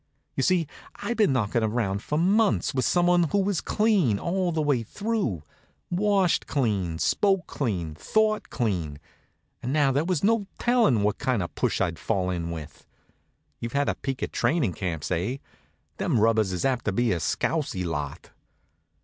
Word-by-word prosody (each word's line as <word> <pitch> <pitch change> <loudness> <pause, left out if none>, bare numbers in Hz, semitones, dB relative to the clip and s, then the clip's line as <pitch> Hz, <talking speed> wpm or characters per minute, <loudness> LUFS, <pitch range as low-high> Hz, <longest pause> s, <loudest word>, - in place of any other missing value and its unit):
You - - -1
see, 175 +3 +2 0.3
I'd 235 - -4
been 210 -9 +4
knockin' 115 -2 +1
around 105 -3 -1
for 150 - -2
months 195 +2 +2
with 130 -3 0
someone 175 +3 +3
who 195 +6 0
was 195 -3 +1
clean 200 - +2
all 180 - -1
the 160 - -1
way 140 -5 +2
through 195 - -2 0.5
washed 195 -1 +2
clean, 100 - 0
spoke 195 - +2
clean, 90 - -3
thought 215 - 0
clean 90 - -2 0.6
and 125 - -3
now 145 -2 +3
there 140 +3 +1
was 175 -3 -1
no 215 -1 +2
tellin' 230 - +3
what 105 0 0
kind 125 -7 0
of 85 - -6
a - - -40
push - - 0
I'd 85 -1 -1
fall 90 -1 -1
in 85 -2 -3
with. 80 -3 -8 0.7
You've 115 0 -5
had 140 0 +1
a - - +1
peek 135 -2 -4
at - - -3
trainin' 150 - +1
camps, 85 -5 -4
eh? 95 +10 -1 0.6
Them 115 - +1
rubbers 110 -2 +3
is 90 -2 -2
apt 130 -3 0
to 110 - +1
be 120 +3 +1
a 90 - 0
scousy 95 - -1
lot. 80 - -4
130 Hz, 175 wpm, -26 LUFS, -, 0.7 s, been